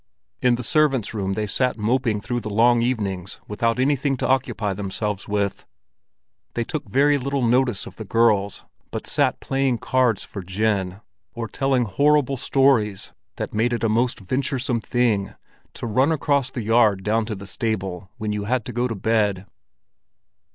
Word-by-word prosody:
In 125 -1 +4
the 125 - -5
servants' 135 -4 +2
room 100 -3 -2
they 105 +1 -1
sat 125 +6 0
moping 115 -1 0
through 120 +4 -2
the 110 -2 -6
long 115 +3 +4
evenings 100 -7 -2
without 115 +3 0
anything 140 0 +1
to - - -1
occupy 120 -6 0
themselves 100 +1 -3
with. 100 -1 -2 0.9
They 120 - 0
took 135 -2 -5
very 145 +5 +3
little 140 0 -1
notice 125 +1 +2
of - - -11
the 110 - -5
girls, 105 -2 +1 0.2
but - - -5
sat - - +1
playing 135 -2 0
cards 125 -2 +1
for 100 - -7
gin, 95 0 -1 0.3
or 115 -1 -3
telling 135 +1 +1
horrible 140 +5 +2
stories 120 -7 +2 0.2
that - - -5
made 115 +3 +1
it 115 - -2
a 115 - +2
most 120 +3 +1
venturesome 130 +3 -1
thing 110 -4 0 0.4
to - - -6
run 130 +7 +2
across 140 -4 +1
the 125 -3 -5
yard 110 -3 +3
down 110 +2 +1
to 110 - -3
the 100 0 -9
stable 95 -3 -3
when 105 -2 -2
you 105 -1 -3
had 120 +1 0
to 125 - -6
go 120 +2 0
to 115 - -4
bed. 105 -2 +1
115 Hz, 170 wpm, -23 LUFS, 105-130 Hz, 0.9 s, In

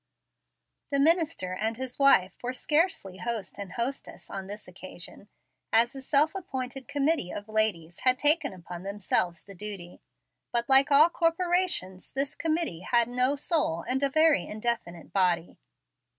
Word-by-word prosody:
The 280 - +1
minister 320 - +2
and 220 +4 -2
his 260 0 -6
wife 195 -9 +5
were 250 +1 -3
scarcely 295 - 0
host 230 -4 -4
and 195 -3 -7
hostess 245 +4 -5
on 195 -1 -6
this 205 +2 -8
occasion, 185 +2 -10 0.4
as 235 +3 +4
a 270 - -7
self 295 +4 +3
appointed 270 -8 -5
committee 285 - 0
of 205 +1 -7
ladies 210 -7 0
had 255 0 +3
taken 300 +5 +3
upon 175 -1 -9
themselves 190 -3 -1
the 200 - -12
duty; 190 -2 -7 0.5
but, 235 0 +1
like 270 +1 +6
all 300 +4 +6
corporations, 340 - -1
this 275 +1 -2
committee 320 - -1
had 235 +5 +1
no 250 +3 +1
soul 285 - 0
and 260 +2 0
a 280 - +2
very 310 - +3
indefinite 215 -6 -4
body. 180 -3 0
240 Hz, 150 wpm, -28 LUFS, 190-285 Hz, 0.5 s, like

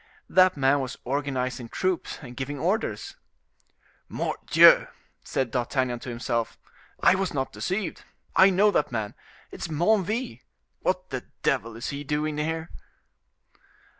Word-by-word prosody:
That 185 -3 +4
man 135 +1 +3
was 130 -2 -4
organizing 130 -3 -2
troops 185 +4 -2
and 125 -2 -9
giving 135 +3 -4
orders. 190 +10 -2 0.9
"Mordioux!" - - +5 0.4
said 130 -4 -2
D'Artagnan 125 0 -1
to 125 - -8
himself, 115 -1 -2 0.5
"I - - +7
was 190 -4 -1
not 135 -1 -1
deceived; 190 0 -3 0.3
I 190 - +7
know 200 +3 +4
that 150 - +1
man,—it 110 -4 -7
is - - -2
Menneville. 185 - 0 0.4
What - - -1
the - - -4 0.2
devil 115 +1 0
is 120 +4 -5
he 145 0 -5
doing 150 +1 -1
here?" 160 +2 -2
145 Hz, 130 wpm, -26 LUFS, 125-185 Hz, 0.9 s, I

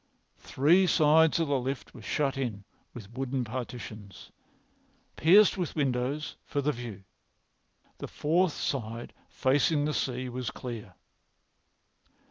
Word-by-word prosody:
Three 170 +8 +3
sides 160 0 +4
of 165 - +1
the 140 -2 +1
lift 130 -3 -4
were 120 - -11
shut 135 +5 -1
in 120 -7 -3 0.3
with 110 -2 -11
wooden 130 0 -2
partitions, 110 -4 -7 0.8
pierced 195 +5 +5
with 175 - -3
windows 140 0 -1
for 145 - -3
the 145 +2 +1
view. 115 -7 -8 1.0
The - - -5
fourth 170 +2 +1
side, 115 -4 -4 0.2
facing 145 +3 +2
the 150 - -1
sea, 130 -2 -2
was 125 -1 -4
clear. 115 -7 -8
130 Hz, 120 wpm, -29 LUFS, 120-150 Hz, 1.0 s, pierced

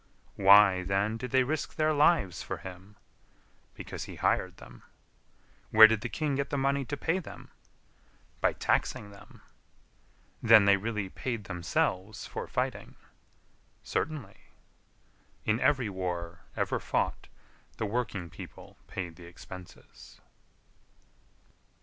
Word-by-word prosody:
Why, 100 -1 +7
then, 100 +4 0
did 125 +2 -5
they 130 +1 +4
risk 155 +4 -3
their 155 0 +2
lives 145 - +3
for - - -5
him? 95 +3 -11 0.8
Because - - -7
he - - -9
hired 95 0 0
them. - - -14 0.9
Where 110 0 +10
did 110 -1 +3
the 120 - -4
king 150 +4 -1
get 140 0 -2
the 145 - -1
money 140 +1 +1
to 145 +3 -4
pay 165 +6 0
them? 185 - -11 0.9
By - - +2
taxing 100 - -1
them. 100 - -16 1.0
Then 110 -3 +7
they 100 0 +6
really 105 -1 -3
paid 115 +1 -4
themselves 95 +2 -2
for - - -6
fighting? - - -3 0.9
Certainly. 155 -2 -3 1.1
In 110 +2 +2
every 130 -3 +2
war 90 -3 -5
ever - - 0
fought - - -2 0.5
the 110 - -2
working 100 -6 -3
people - - -11
paid 85 -3 -6
the 90 - -12
expenses. 90 +1 -13
105 Hz, 125 wpm, -29 LUFS, 95-130 Hz, 1.1 s, Where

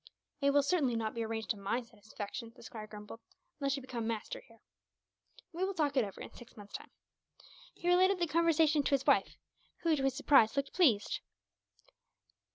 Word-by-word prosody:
"It 280 - +4
will 285 0 +4
certainly 285 -6 +1
not 220 -1 -2
be 230 - -3
arranged 220 0 -2
to 215 - -3
my 205 +5 -1
satisfaction," 220 +1 -8
the - - -15
squire 220 -2 -8
grumbled, 210 +1 -10 0.4
"unless 275 -1 0
you 275 - -7
become 235 -3 -4
master 225 -2 -3
here." 230 -2 -19 1.0
"We 350 +3 -2
will 385 0 -1
talk 295 -4 +1
it 260 - +4
over, 200 -2 -7
in - - -8
six 240 0 -14
months' 205 -1 -12
time." - - -7 0.9
He 345 - -6
related 370 +2 +5
the 350 - +1
conversation 320 -1 +3
to 280 - +2
his 270 - -3
wife - - +3 0.5
who, 330 -2 +3
to 280 - -2
his 270 -1 +1
surprise, 275 -5 +4
looked 275 0 -1
pleased. 255 - +3
265 Hz, 185 wpm, -33 LUFS, 225-305 Hz, 1.0 s, related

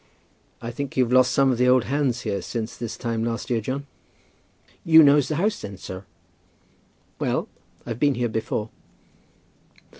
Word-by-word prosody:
"I 115 - -4
think 140 +3 -6
you've 125 -1 +2
lost 130 -1 +5
some 135 -1 +3
of 120 - -2
the 125 0 +4
old 125 -2 +5
hands 135 -3 0
here 105 -4 -2
since 115 0 -5
this 115 -2 -6
time 115 -2 -2
last 115 0 -3
year, 115 -2 +1
John?" 135 +5 -4 1.0
"You 160 -1 +8
knows 145 -1 +5
the 155 - -2
house 205 +6 0
then, 100 -1 -7
sir?" 95 +1 -8 1.1
"Well; - - -1 0.4
I've 115 -1 -5
been 145 -1 +3
here 120 0 0
before." 110 -1 -3
125 Hz, 160 wpm, -24 LUFS, 115-140 Hz, 1.1 s, You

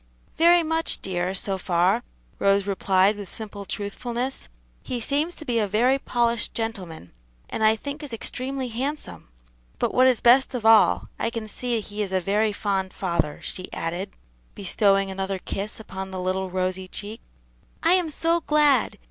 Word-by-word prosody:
"Very 340 +1 +5
much, 325 +1 0
dear, 185 0 -1
so 195 0 +2
far," 180 +5 +2 0.4
Rose 200 0 +3
replied 195 0 +2
with 200 -3 -7
simple 205 -2 -7
truthfulness; 240 +6 -3 0.3
"he 245 - -3
seems 295 +8 -1
to 310 - -10
be 240 -4 +1
a 210 - +1
very 245 +7 +3
polished 235 -3 0
gentleman, 185 - -5 0.4
and 220 - -2
I 215 0 +5
think 285 +6 -6
is 290 -3 -7
extremely 255 +3 -3
handsome; 270 +6 -4 0.5
but - - -1
what 255 +1 +5
is 255 -3 +3
best 255 +2 +5
of 235 -3 -4
all, 225 -1 +5
I - - 0
can 230 -1 -5
see 240 +2 -2
he 210 0 -5
is 200 -2 -2
a 190 - +2
very 210 +4 +1
fond 195 -2 -2
father," 170 -5 -1
she 185 - -5
added, 175 +4 -3 0.5
bestowing 195 0 +2
another 195 0 -2
kiss 200 +3 -5
upon 190 -3 -7
the 190 -1 -5
little 185 +1 -1
rosy 185 0 -2
cheek. 210 +4 -6 0.6
"I 335 +2 +5
am 360 -3 +2
so 335 +3 +1
glad!" 290 -8 +4
215 Hz, 165 wpm, -24 LUFS, 190-250 Hz, 0.6 s, Very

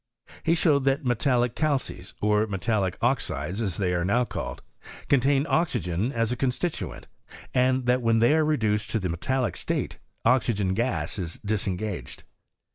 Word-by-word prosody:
He 165 - +2
riiowed 155 -5 +3
that 135 +2 +1
metallic 120 0 +1
calcesy 135 - -1
or 105 +1 +3
metallic 95 -1 -1
oxides, 100 - 0
as 95 -6 -2
they 90 -3 0
are 85 -1 0
now 120 +7 +2
called, - - -5 0.5
contain 140 +1 +3
oxygen 115 - 0
as 115 -2 0
a - - 0
con 130 +1 +1
stituent, 165 +6 -3 0.5
and 130 0 +2
that 125 +1 +3
when 115 -1 +3
they 120 +5 +4
are 160 - +3
reduced 110 -8 +1
to 110 - 0
the 95 -2 -2
metallic 125 +9 -1
state, - - -3 0.3
oxygen 110 -7 +2
gas 120 0 -1
is 85 -3 -4
disengaged. 100 - -3
115 Hz, 155 wpm, -26 LUFS, 100-130 Hz, 0.5 s, they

